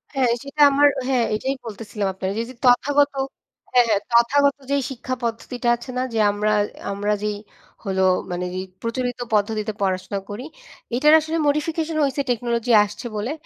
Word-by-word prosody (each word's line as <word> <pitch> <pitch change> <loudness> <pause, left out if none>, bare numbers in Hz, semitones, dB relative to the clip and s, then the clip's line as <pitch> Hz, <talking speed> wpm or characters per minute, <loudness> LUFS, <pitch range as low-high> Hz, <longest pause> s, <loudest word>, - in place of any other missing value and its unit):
হ্যাঁ 255 -3 +2
সেটা 285 +2 -3
আমার 285 +1 +5 0.2
হ্যাঁ 255 -3 +2
এটাই 265 +5 -2
বলতেছিলাম 210 -2 -4
আপনারে 190 0 -3
এইযে 250 - -9
তথাগত 285 +4 +4 0.6
হ্যাঁ, 245 -1 +6
হ্যাঁ। 205 -2 +2
তথাগত 280 +4 +4 0.2
যেই 280 -1 +1
শিক্ষা 255 0 -4
পদ্ধতিটা 240 +1 -2
আছে 240 - -12
না 255 - +1
যে 225 - 0
আমরা 210 +1 0 0.4
আমরা 205 +1 0
যেই 210 -1 -1 0.5
হলো 190 -1 0 0.3
মানে 180 +1 -2
যে - - -2 0.2
প্রচলিত 245 +1 -2 0.2
পদ্ধতিতে 215 +1 0
পড়াশোনা 190 +1 -1
করি 210 +6 -6 0.5
এইটার 300 +5 +5
আসলে 320 +1 -2
মোডিফিকেশন 315 +2 -1
হইছে 280 +1 -1
টেকনোলজি 235 0 -1
আসছে 210 +4 -8
বলে। 220 +7 -2
240 Hz, 155 wpm, -22 LUFS, 210-275 Hz, 0.6 s, হ্যাঁ